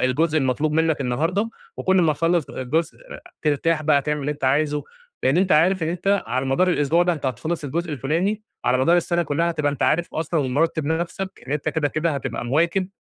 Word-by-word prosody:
الجزء 155 +5 +2
المطلوب 145 +3 0
منّك 160 -1 +1
النهارده، 165 - 0 0.3
وكل 190 0 +1
ما 155 -2 +3
تخلص 165 +1 0
جزء 155 +6 -2 0.4
ترتاح 155 +1 +1
بقى، 145 -2 +3
تعمل 150 0 -1
اللي 145 +2 -1
أنت 145 - -7
عايزه، 145 +2 +1 0.4
لأن 135 +5 +3
أنت 185 -1 +3
عارف 175 +3 +4
إن 160 - 0
أنت 190 +4 0
على 130 +2 -1
مدار 180 +8 +2
الأسبوع 165 +1 +2
ده 175 0 +2
أنت 150 -4 -4
هتخلص 145 +7 -3
الجزء 160 +3 -3
الفُلاني، 170 - -1 0.2
على 125 +1 +2
مدار 170 +7 +4
السنة 175 0 +1
كلّها 165 +3 0
هتبقى 150 -3 0
أنت 145 - -4
عارف 170 +3 +1
أصلًا 160 0 -1
ومرتب 145 +4 0
نفْسك 170 +4 -3
إن 135 - -4
أنت 150 +1 -1
كده 150 -1 0
كده 155 +3 -1
هتبقى 135 -3 -4
مواكب 170 +8 +1
155 Hz, 200 wpm, -22 LUFS, 140-170 Hz, 0.4 s, عارف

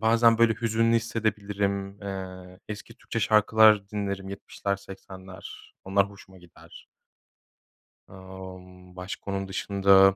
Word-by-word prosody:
bazen 115 +1 +5
böyle 115 -1 +5
hüzünlü 115 +1 +2
hissedebilirim. 100 -3 -2
Eee, 95 -1 -7
eski 105 -1 -7
Türkçe - - -4
şarkılar 105 -1 +5
dinlerim; 100 -2 -3
yetmişler, 100 0 -3
seksenler, 95 -1 -11
onlar 100 +1 +2
hoşuma 95 -1 -15
gider. 90 -1 -16 1.2
Imm, 95 -1 -11
başka 95 +2 -6
onun 95 0 -2
dışında 95 0 +5
100 Hz, 105 wpm, -27 LUFS, 95-105 Hz, 1.2 s, bazen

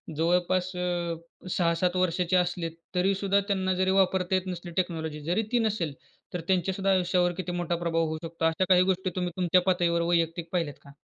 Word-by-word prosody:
जवळपास 180 +3 +1
अ, 175 -1 -1 0.3
6-7 175 +1 +1
वर्षाचे 180 0 +1
असले 175 -1 0 0.3
तरीसुद्धा 195 +2 +2
त्यांना 190 -2 +1
जरी 185 - +3
वापरता 190 -1 +2
येत 185 0 -1
नसली 175 -1 -5
टेक्नॉलॉजी 160 -4 -2
जरी 175 +8 0
ती 245 - +3
नसेल, 180 -9 -1 0.4
तर 180 - -3
त्यांच्या 190 0 +1
सुद्धा 195 +1 0
आयुष्यावर 180 -1 +2
किती 180 -1 -3
मोठा 175 -1 -1
प्रभाव 165 -1 0
होऊ 155 0 -3
शकतो? 165 0 -3
अशा 165 +3 +2
काही 180 -1 +6
गोष्टी 185 0 -2
तुम्ही 180 -1 -1
तुमच्या 180 0 +3
पातळीवर 175 -2 +1
वैयक्तिक 170 0 0
पाहिल्यात 165 -6 -1
का? 140 - -14
180 Hz, 180 wpm, -27 LUFS, 170-185 Hz, 0.4 s, काही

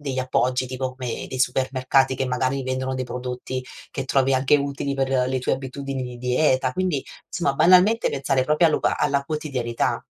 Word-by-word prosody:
degli 135 -3 -4
appoggi, 130 0 +1
tipo 130 0 -4
come 125 -3 -4
dei 130 - -5
supermercati 130 +1 +2
che 130 - -1
magari 130 +2 -1
vendono 130 0 -2
dei 130 0 -2
prodotti 125 +1 -5 0.3
che 135 -2 -4
trovi 135 0 +2
anche 130 +3 +4
utili 140 0 -2
per 135 0 -1 0.2
le 130 0 0
tue - - 0
abitudini 135 0 -4
di 125 -1 -6
dieta 130 +1 +1
quindi, 180 -6 -1 0.2
insomma, 155 -6 -1
banalmente 185 +9 +5
pensare 135 -1 0
proprio 150 +3 +3
allo 155 - +2
ba - - +1
alla 140 -1 +1
quotidianità. 135 -6 -2
130 Hz, 175 wpm, -23 LUFS, 130-140 Hz, 0.3 s, banalmente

